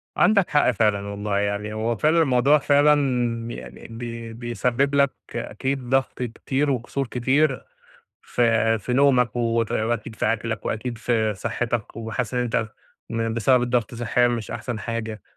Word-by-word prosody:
عندك 200 -4 +4
حق 145 -3 +3
فعلًا 105 -3 +1
والله، 100 0 -2
يعني 100 +1 -2
هو 115 +2 -1
فعلًا 155 +7 +3
الموضوع 140 +1 +4
يعني 125 - +1
بي 115 0 -7
بيسبب 120 +4 -1
لك 140 -1 +4 0.2
أكيد 125 +3 -3
ضغط 130 -1 0
كتير 135 +4 -1
وقُصُور 135 +2 -2
كتير 130 +4 +1 0.6
ف - - -6 0.4
في 125 - -4
نومك 125 -2 +3
وت 115 -1 0
وأكيد 110 0 -1
في - - -1
أكلك 110 -1 -4
وأكيد 120 +1 -3
في 110 -3 0
صحتك، 115 +2 -3
وحاسس 115 +1 -3
إن 125 - +1
أنت 115 -2 -1 0.4
م 115 0 -1
بسبب 120 +2 +3
الضغط 120 -1 0
صحيًا 120 +1 +2
مش 115 -3 -3
أحسن 120 0 -4
حاجة. 110 -2 -4
120 Hz, 145 wpm, -23 LUFS, 110-130 Hz, 0.6 s, عندك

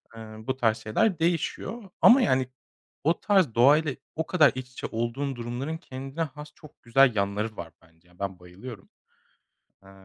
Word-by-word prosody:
Eee, 115 - -9
bu 110 +4 -6
tarz 115 -3 +2
şeyler 160 - 0
değişiyor 180 +6 -2
ama 255 +3 +8
yani 130 - +2 0.5
o 165 +3 +2
tarz 190 - +2
doğayla 140 +3 +4 0.2
o 160 - -2
kadar 160 -5 +5
iç 130 -1 -6
içe - - -5
olduğun 120 +5 -2
durumların 120 +6 -4
kendine 135 -1 -7
has 150 0 -8
çok 150 - -17
güzel 125 0 +4
yanları 100 +2 -1
var 85 -2 -8
bence 80 +1 -26
ya. 90 0 -25
Ben 100 -2 -4
bayılıyorum. 95 +5 -11 0.9
Eee, 95 - -16
130 Hz, 160 wpm, -26 LUFS, 110-155 Hz, 0.9 s, ama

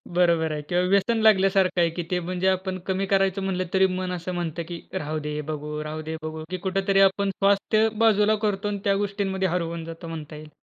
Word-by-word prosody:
बरोबर 170 -3 +3
आहे 150 - -3
किंवा 175 0 +2
व्यसन 210 +4 +3
लागल्यासारखं 190 -3 +3
आहे 170 +1 0
ते 180 - +1
म्हणजे 185 +1 -1
आपण 190 0 -1
कमी 190 +1 0
करायचं 195 0 +2
म्हटलं 185 -1 -1
तरी 190 0 +5
मन 185 0 -3
असं 180 +1 -5
म्हणतं, 170 -1 -3
की 170 -1 -6
"राहू 155 -4 -3
दे, 150 - -3 0.2
बघू, 150 0 -5 0.2
राहू 155 +1 -5
दे, 160 - -2
बघू." 155 0 -5
की 185 - -2
कुठेतरी 195 +1 +1
आपण 200 +1 -2
स्वास्थ्य 200 +2 +3 0.2
बाजूला 215 0 +4
करतो 205 0 -1
आणि 200 - -4
त्या 200 -1 +2
गोष्टींमध्ये 195 -2 -1
हरवून 170 -1 -3
जातो 165 +1 -9
म्हणता 155 -1 -7
येईल. 150 0 -10
185 Hz, 205 wpm, -25 LUFS, 165-195 Hz, 0.2 s, तरी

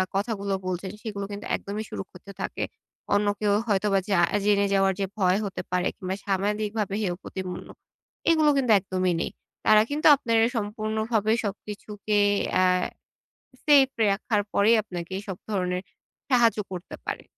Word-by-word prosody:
কথাগুলো 200 -1 -1
বলছেন 185 +1 -3
সেগুলো 205 -3 -4
কিন্তু 205 0 -6
একদমই 210 +2 -5
সুরক্ষিত 185 0 -9 0.2
থাকে। - - -3 0.5
অন্য 205 0 +2
কেউ 210 -1 +2
হয়তোবা 200 -1 +2
জা 195 - +3 0.3
জেনে 200 -1 +3
যাওয়ার 195 0 +3
যে 195 - +1
ভয় 185 -1 +3
হতে 195 - -4
পারে 180 0 +1
কিংবা 185 0 -3
সামাজিকভাবে 205 +1 -1
হেয় 180 -4 -1
প্রতিপন্ন, 185 -1 -6 0.6
এগুলো 310 -2 +4
কিন্তু 250 -4 +2
একদমই 185 -1 -1
নেই। - - -2 0.3
তারা 215 0 +7
কিন্তু 295 +2 +2
আপনার 230 -4 0 0.2
সম্পূর্ণভাবে 220 +1 -1
সবকিছুকে 210 +1 -3 0.3
অ্যা 185 0 +4 1.0
সেফ 285 -3 +6 0.2
রাখার 205 +1 0
পরেই 215 +3 +5
আপনাকে 180 -2 -6
সব 190 - -3
ধরনের 180 -2 -1 0.5
সাহায্য 235 -4 +4
করতে 180 0 -7
পারে। - - -4
205 Hz, 140 wpm, -26 LUFS, 190-215 Hz, 1.0 s, তারা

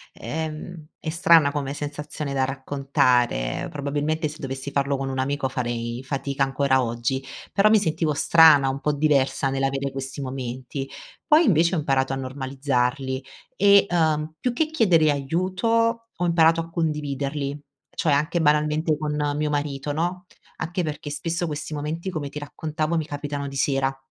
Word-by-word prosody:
emh, 160 0 -5
è 160 - -4
strana 165 -2 +5
come 140 -2 -2
sensazione 145 0 -5
da 135 -1 +1
raccontare, 130 - 0
probabilmente 150 +2 -1
se 150 - -8
dovessi 135 0 -5
farlo 140 0 0
con 135 0 -3
un 130 0 -3
amico 140 +1 0
farei 120 -1 -3
fatica 140 +1 -1
ancora 135 -1 +2
oggi, 120 +3 -2 0.3
però 210 +1 +5
mi 220 - +6
sentivo 160 -4 0
strana 155 -2 +6
un 135 +1 -2
po' 150 - +1
diversa 140 -2 +1
nell'avere 135 0 -1
questi 135 +1 -5
momenti, 130 0 -5 0.4
poi 320 +2 +5
invece 170 - +3
ho - - +1
imparato 135 -2 +1
a 135 - -1
normalizzarli 130 0 -2 0.3
e, 200 +1 +6
uhm, 155 -2 +1
più 250 - +1
che 270 +7 +1
chiedere 190 - +3
aiuto 190 - 0
ho 180 - 0
imparato 165 -1 +4
a 165 0 -4
condividerli, 145 -3 -2 0.4
cioè 160 -6 +1
anche 155 +4 +1
banalmente 150 +1 +2
con 150 -1 -2 0.2
mio 150 0 0
marito, 145 -1 -2
no, 175 +3 -2 0.3
anche 175 +2 -2
perché 150 -1 -5
spesso 165 +3 -2
questi 155 0 -5
momenti 155 +5 -3
come 155 -6 -4
ti 145 +2 -7
raccontavo 155 +2 -3
mi 155 - -1
capitano 145 -1 -4
di 140 - -8
sera. 135 0 0
145 Hz, 155 wpm, -24 LUFS, 135-160 Hz, 0.4 s, mi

